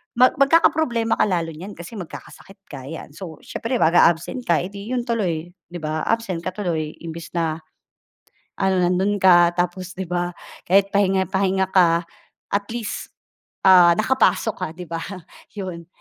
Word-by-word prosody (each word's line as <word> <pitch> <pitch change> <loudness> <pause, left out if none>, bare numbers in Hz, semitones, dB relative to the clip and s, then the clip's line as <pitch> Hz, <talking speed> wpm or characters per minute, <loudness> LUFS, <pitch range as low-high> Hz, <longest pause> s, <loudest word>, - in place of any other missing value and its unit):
mag 250 +2 +6
magkakaproblema 275 -5 +3
ka - - +4
lalo 170 -4 -1
niyan 185 +6 -9
kasi 185 +5 -9
magkakasakit 195 +3 -11
ka 130 0 -8
'yan, 160 -1 -8
so 160 0 -9
siyempre 235 +3 -4
mag-a-absent 170 +5 +2
ka, 170 -1 +2
eh, 185 - -6
'di 205 +5 -5
'yon 245 - -1
tuloy, 180 -9 -2 0.2
'di 175 0 -8
ba? 155 +1 -2
Absent 225 -6 -1
ka 185 0 -4
tuloy, 160 -6 -3
imbes 165 0 -7
na 160 -1 -1 1.0
ano 190 0 +2
nando'n 190 +3 +1
ka 175 -2 +5
tapos 180 +1 -2
'di 190 - -3
ba, 175 0 -2 0.4
kahit 195 +1 +3
pahinga-pahinga 190 -1 +1
ka 170 -2 +4 0.5
at 200 0 0
least, 230 -2 -4 0.6
ah, 180 -2 +8
nakapasok 225 -1 +2
ka, 185 - -1
'di 180 -1 -8
ba? 165 - -2 0.6
'Yon. 175 -4 -6
185 Hz, 155 wpm, -22 LUFS, 170-205 Hz, 1.0 s, ah